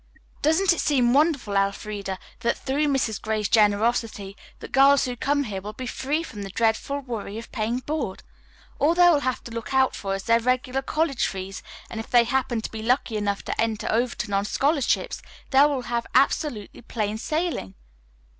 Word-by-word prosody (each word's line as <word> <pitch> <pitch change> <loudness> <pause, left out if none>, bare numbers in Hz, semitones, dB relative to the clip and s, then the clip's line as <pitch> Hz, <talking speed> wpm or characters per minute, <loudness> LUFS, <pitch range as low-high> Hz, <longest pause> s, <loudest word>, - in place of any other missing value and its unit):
"Doesn't 335 +5 +4
it 345 - -4
seem 250 -5 +3
wonderful, 280 -8 +2
Elfreda, 195 0 -1 0.2
that 235 - 0
through 285 +3 0
Mrs. 265 -7 0
Gray's 215 -1 -1
generosity 210 -1 +1 0.2
the - - -9
girls 275 +1 +5
who 250 -1 -3
come 285 +4 0
here 200 -6 -5
will 210 +2 -7
be 255 +4 -6
free 285 +6 -2
from 210 -10 -8
the 195 - -6
dreadful 225 +7 0
worry 225 -5 -5
of 230 - -9
paying 225 +3 -1
board? 260 -8 -4 0.6
All 315 +4 +3
they 355 0 +6
will 300 - +3
have 255 -3 -2
to 235 - -9
look 230 +4 -5
out 265 0 +3
for 195 -1 -3
is 195 - -5
their 230 +2 +4
regular 255 +2 0
college 305 -1 0
fees, 190 0 -6 0.3
and 225 - -6
if 225 - -7
they 240 -1 +6
happen 240 -1 0
to - - -6
be 220 - -6
lucky 240 0 +1
enough 205 -1 -1
to - - -2
enter 225 -2 -1
Overton 235 -3 -1
on 195 0 +2
scholarships 280 +4 0 0.3
they 270 0 +6
will 275 -4 -2
have 235 0 -2
absolutely 255 -5 +1
plain 215 -3 -3
sailing." 310 - -2
240 Hz, 185 wpm, -25 LUFS, 210-275 Hz, 0.6 s, they